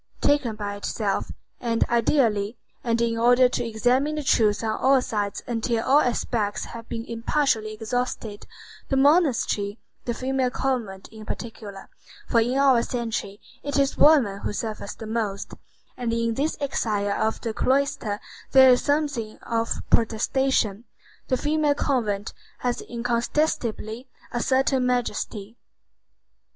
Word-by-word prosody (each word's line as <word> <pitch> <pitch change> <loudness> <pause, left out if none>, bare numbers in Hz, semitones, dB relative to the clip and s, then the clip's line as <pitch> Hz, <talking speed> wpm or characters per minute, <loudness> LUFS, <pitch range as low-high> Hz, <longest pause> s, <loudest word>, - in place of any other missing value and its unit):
Taken 280 -6 +2
by 205 -1 -4
itself, 200 -1 -2 0.3
and 230 -1 +1
ideally, 230 -3 +1 0.3
and 235 -1 +1
in 230 -1 0
order 245 +2 +5
to 250 - -2
examine 245 +6 +1
the 300 - -3
truth 215 -5 +2
on 220 - 0
all 265 +1 +5
sides 205 -5 -3
until 230 -1 -1
all 280 +3 +5
aspects 230 -5 -1
have 230 -1 -10
been 230 -1 -4
impartially 230 -1 0
exhausted, 220 -1 -4 0.4
the 270 - +1
monastery, 265 - +2 0.3
the 240 - -2
female 260 0 0
convent 235 -8 -2
in 220 -1 -11
particular,—for 215 +1 -5
in 245 +4 0
our 270 -4 +5
century 225 -5 -3 0.2
it 285 0 -2
is 275 -1 +2
woman 260 -11 +5
who - - -3
suffers 215 -1 -4
the 220 - -8
most, 215 -3 -3 0.4
and 245 -2 -2
in 230 0 0
this 285 +7 -1
exile 210 -7 -1
of 220 - -2
the 225 - -3
cloister 255 -5 0 0.3
there 265 -1 +8
is 250 - +4
something 285 -7 -1
of 230 0 -1
protestation,—the 235 +1 0
female 300 +1 +1
convent 225 -8 -1 0.2
has 245 -1 -2
incontestably 235 -1 -2 0.2
a 240 - -2
certain 265 0 +2
majesty. 240 -3 -2
235 Hz, 130 wpm, -25 LUFS, 215-265 Hz, 0.4 s, there